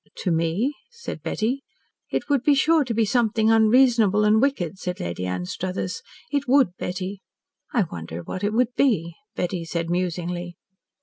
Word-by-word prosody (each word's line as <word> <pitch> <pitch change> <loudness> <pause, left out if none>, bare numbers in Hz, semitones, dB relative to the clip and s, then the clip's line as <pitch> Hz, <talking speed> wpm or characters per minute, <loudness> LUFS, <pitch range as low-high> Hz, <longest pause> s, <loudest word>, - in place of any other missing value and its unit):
"To 180 - 0
me?" 170 - +1 0.2
said 465 -1 -8
Betty. 245 +5 -1 0.5
"It - - -2
would 280 -4 +2
be 285 +2 +4
sure 315 +3 +4
to 240 - -2
be 225 0 +3
something 225 0 +2
unreasonable 225 -2 +4
and 215 +1 +4
wicked," 195 - 0
said 180 0 -4
Lady 90 +1 -3
Anstruthers. 165 - -3 0.3
"It 285 -1 -1
would, 265 -4 +5
Betty." 185 +2 -4 0.5
"I 235 - +3
wonder 85 - -7
what 185 - -6
it 205 - +1
would 245 +2 +1
be?" 180 - +2 0.2
Betty 175 -1 -2
said 165 0 -3
musingly. 175 0 -2
205 Hz, 160 wpm, -24 LUFS, 175-245 Hz, 0.5 s, would